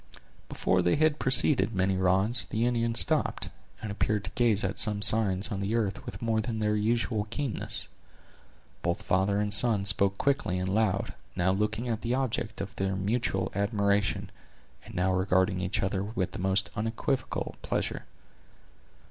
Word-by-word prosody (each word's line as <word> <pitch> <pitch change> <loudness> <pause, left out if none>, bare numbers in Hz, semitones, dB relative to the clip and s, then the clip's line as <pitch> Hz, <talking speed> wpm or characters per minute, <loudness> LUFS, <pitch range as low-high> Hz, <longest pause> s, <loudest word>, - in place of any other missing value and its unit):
Before 90 -1 +1
they 90 0 +2
had 155 0 +2
proceeded 130 -3 +4
many 95 0 +1
rods, 95 +5 +2
the 115 +1 -1
Indians 115 -1 +2
stopped, - - +3 0.3
and 105 - -4
appeared 105 0 -1
to - - -7
gaze 115 -3 +2
at - - -2
some 105 -2 +2
signs 105 -3 +3
on 100 - -3
the 100 +3 -1
earth 115 +2 -1
with 120 - -7
more 110 -1 +1
than 110 +1 -4
their 105 -1 0
usual 110 0 0
keenness. 135 0 -2 0.9
Both 85 0 -2
father 95 +2 +1
and 105 0 +1
son 105 -2 +3
spoke 100 +2 +2
quick 140 +4 +1
and 90 0 -2
loud, 100 -1 0 0.2
now 90 0 +1
looking 105 +4 -1
at 115 -2 -2
the 120 +1 -1
object 125 -6 -2
of 100 0 -7
their 95 0 -1
mutual 95 -1 -1
admiration, 100 0 0 0.5
and - - -12
now 90 +1 +1
regarding 95 0 +1
each 95 +3 -2
other 95 0 -1
with 100 -3 -3
the - - -7
most 95 +1 0
unequivocal 115 +5 -3
pleasure. - - -3
105 Hz, 165 wpm, -28 LUFS, 95-115 Hz, 0.9 s, proceeded